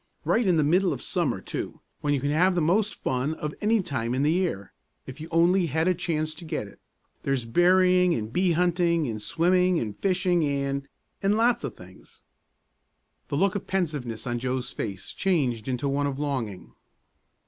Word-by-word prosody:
Right 230 -2 +2
in 175 -3 +4
the 155 - +3
middle 180 +5 +3
of - - -6
summer, - - 0
too, - - -5 0.2
when 145 - -1
you 145 - +2
can 145 +1 0
have 180 +5 +3
the - - +2
most 195 +7 +1
fun 130 +5 -1
of 150 -1 -4
any 215 -1 +2
time 120 -5 -2
in 135 - +1
the 150 - +3
year, 170 - -1 0.3
if 130 +4 -9
you 160 - -6
only 170 +2 +3
had 160 +3 0
a 185 - +4
chance 155 -3 -2
to 160 - -11
get 155 -10 -4
it! 100 - -16 0.4
There's 135 -4 -1
berrying 180 +5 +4
and 110 +1 -4
bee 180 +1 +2
hunting 170 -1 +2
and 110 -2 -4
swimming 180 - +2
and 105 -3 -4
fishing 180 - +1
and 140 -1 -1 0.3
and 200 +1 +2
lots 235 -3 +2
of 135 -6 -4
things." 90 0 -16 1.1
The 140 - -2
look 195 +3 +2
of 205 - -5
pensiveness 145 -12 -2
on 120 -1 -2
Joe's 130 0 -2
face 100 -4 -5
changed 135 - 0
into 130 +2 -1
one 140 +1 0
of 135 -1 -3
longing. 115 - -4
155 Hz, 190 wpm, -26 LUFS, 130-180 Hz, 1.1 s, in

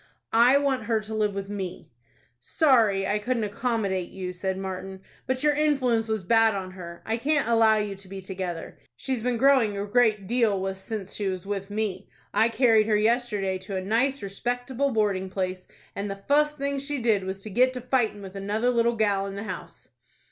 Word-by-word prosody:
"I 240 +4 +6
want 270 -5 0
her 225 -1 +1
to 215 0 -7
live 210 -2 0
with 195 0 -4
me." 195 -7 -6 0.5
"Sorry 215 - +3
I 205 +2 0
couldn't 235 +1 -1
accommodate 205 -4 -1
you," 185 -1 -5
said 190 +1 -3
Martin, 190 0 -6 0.3
"but 260 +1 -1
your 300 -1 +4
influence 265 -7 +1
was 220 -3 -2
bad 225 +2 +4
on 185 -1 -4
her. 170 -2 -10
I 225 +1 -1
can't 285 +1 +1
allow 225 -2 +5
you 210 -1 -2
to 195 0 -14
be 195 +1 -7
together. 185 -3 -6 0.2
She's 260 - -2
been 245 0 0
growing 250 -5 +4
a 200 - -2
great 215 -2 +2
deal 225 -2 +2
wus 190 0 -3
since 200 -2 -5
she 205 - -2
was 185 -1 -3
with 195 -1 -4
me. 205 -2 -3 0.2
I 220 +3 +4
carried 225 -2 +4
her 215 -1 +3
yesterday 210 -4 0
to 195 +1 -7
a - - -2
nice, 245 +7 +1
respectable 245 +7 -2
boarding 205 -5 0
place, 185 -1 -3 0.3
and 200 +1 -3
the 195 - -3
fust 300 +8 +1
thing 280 0 -1
she 285 +1 -3
did 225 -6 +1
was 190 +1 -5
to 215 - -6
get 250 +5 +4
to 250 - -5
fighting 235 -5 0
with 190 0 -9
another 210 +5 0
little 235 -1 +2
gal 200 -3 +1
in 195 - -6
the 200 - -5
house." - - -8
215 Hz, 200 wpm, -26 LUFS, 195-245 Hz, 0.5 s, I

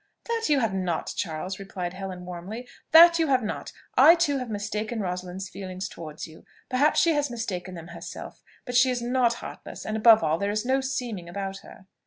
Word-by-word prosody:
"That 460 -1 -1
you 285 -3 +4
have 225 -4 0
not, 180 -4 -2
Charles!" 180 +2 -4
replied 185 -2 -5
Helen 185 -1 -7
warmly; 185 +8 -7 0.2
"that 335 +1 +8
you 325 - +2
have 260 -3 +2
not! 215 - -4 0.2
I 335 - +8
too 290 -5 +1
have 250 -2 -5
mistaken 215 +2 -3
Rosalind's 180 0 -4
feelings 185 0 -6
towards 155 -4 -8
you. 160 0 -14 0.3
Perhaps 280 +4 +3
she 330 +1 +4
has 290 -2 0
mistaken 190 -6 -4
them 165 0 -9
herself: - - -9 0.2
but 245 - -5
she 255 +2 +6
is 245 -1 -1
not 240 -1 +2
heartless; - - -9
and 215 - -2
above 220 -1 +6
all, 160 +1 +1
there 200 - 0
is 215 +2 -1
no 265 +1 +2
seeming 245 -9 -4
about 195 +1 -4
her." 195 - -15
210 Hz, 200 wpm, -26 LUFS, 185-255 Hz, 0.3 s, that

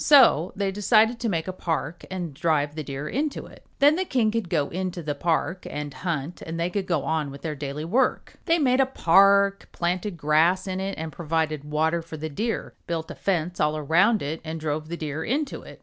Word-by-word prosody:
So 240 - +6
they 195 -1 -1
decided 220 +3 +3
to 235 - -1
make 165 -3 -1
a 185 - -3
park 165 -1 -3
and 175 -5 -4
drive 145 0 +1
the 155 - -4
Deer 140 +2 -5
into 285 - -2
it. - - -15
Then 295 +2 +5
the 375 - +1
king 245 -11 +1
could 220 -5 -2
go 150 -5 +1
into 180 -1 -4
the 150 -1 -1
park 165 +4 -1
and 150 -1 -5
hunt 170 -2 -4
and 165 +1 -5
they 170 +2 0
could 195 0 -2
go 165 -6 0
on 160 -2 -1
with 140 0 -10
their 160 - -2
daily 145 +1 -5
work. 245 +9 +1
BANYAN - - -24
DEER - - -32
They 335 -1 +3
made 255 0 +3
a 270 - +5
park, 200 -2 +4
planted 180 +2 -2
grass 165 +5 +3
in 190 -1 -3
it 195 +1 -3
and 160 0 -4
provided 155 -3 -2
water 160 +3 +1
for 165 -1 -9
the 155 +1 -4
Deer, 225 +10 -3
built 165 -1 -3
a - - -7
fence 180 -2 -1
all 150 +1 +2
around 175 +8 +3
it 155 +3 -4
and 160 0 -5
drove 155 0 -3
the 170 - -4
Deer 155 0 -4
into 280 +4 -2
it. - - -13
170 Hz, 230 wpm, -25 LUFS, 155-200 Hz, -, So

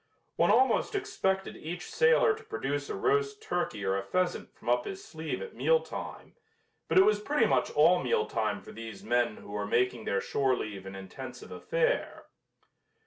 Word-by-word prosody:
One - - +3
almost 265 - +3
expected 195 - -1
each 175 +3 -6
sailor 470 -1 +4
to 445 +1 -10
produce 145 - -3
a - - -3
roast 420 0 +1
turkey 110 - -2
or 95 0 +1
a 100 - 0
pheasant 180 - -1
from - - -18
up 120 0 +2
his 195 0 -6
sleeve 160 - -5
at 475 - -9
meal 485 0 +3
time, - - -8 0.5
but - - +1
it 190 - +8
was 210 0 +3
pretty 250 +2 +2
much - - +2
all 170 +4 +4
meal 460 -1 +1
time - - -2
for - - -11
these 115 -3 -9
men 120 -1 +1
who - - -12
were 105 0 -3
making 120 0 +1
their 100 - +1
shore 135 +2 +1
leave 100 -4 -6
an 95 - -7
intensive 120 +7 -9
affair. - - -1
175 Hz, 185 wpm, -30 LUFS, -, 0.5 s, it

